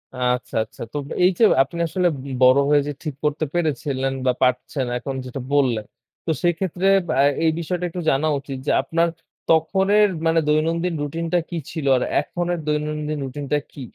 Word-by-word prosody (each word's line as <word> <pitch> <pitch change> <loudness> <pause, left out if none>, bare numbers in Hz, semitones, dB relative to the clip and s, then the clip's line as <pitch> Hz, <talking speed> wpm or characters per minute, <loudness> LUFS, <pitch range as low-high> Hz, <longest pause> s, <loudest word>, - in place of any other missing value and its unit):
আচ্ছা, 125 0 -1
আচ্ছা। 110 - -15
তো - - -2 0.3
এইযে 185 +5 +3 0.2
আপনি 170 +6 -8
আসলে 180 +2 +1 0.2
বি 140 - -8
বড় 130 +2 +7
হয়ে 145 -1 +5
যে 145 - -1
ঠিক 150 -4 -4
করতে 150 +1 0
পেরেছিলেন, 140 -5 -1
বা 125 - +4
পারছেন 125 +1 +1
এখন 135 +2 -5
যেটা 130 +1 -6
বললেন। 125 -7 +2 0.4
তো 165 - 0
সেক্ষেত্রে 175 +1 0 0.2
বা 155 - -1 0.3
এই 160 - +4
বিষয়টা 180 +2 -3
একটু 175 +1 -5
জানা 140 +4 +1
উচিত, 135 0 -7
যে - - +3
আপনার 165 +4 +1 0.4
তখনের 195 +6 +4 0.2
মানে 165 0 +3
দৈনন্দিন 165 +3 +1
রুটিনটা 165 +4 -1
কি 170 - -4
ছিল? 155 -4 -4
আর 125 - 0 0.2
এখন 175 0 -4
এর 175 - -3
দৈনন্দিন 150 0 -2
রুটিনটা 140 +2 -2
কি? 140 - -10
150 Hz, 170 wpm, -22 LUFS, 135-170 Hz, 0.4 s, বড়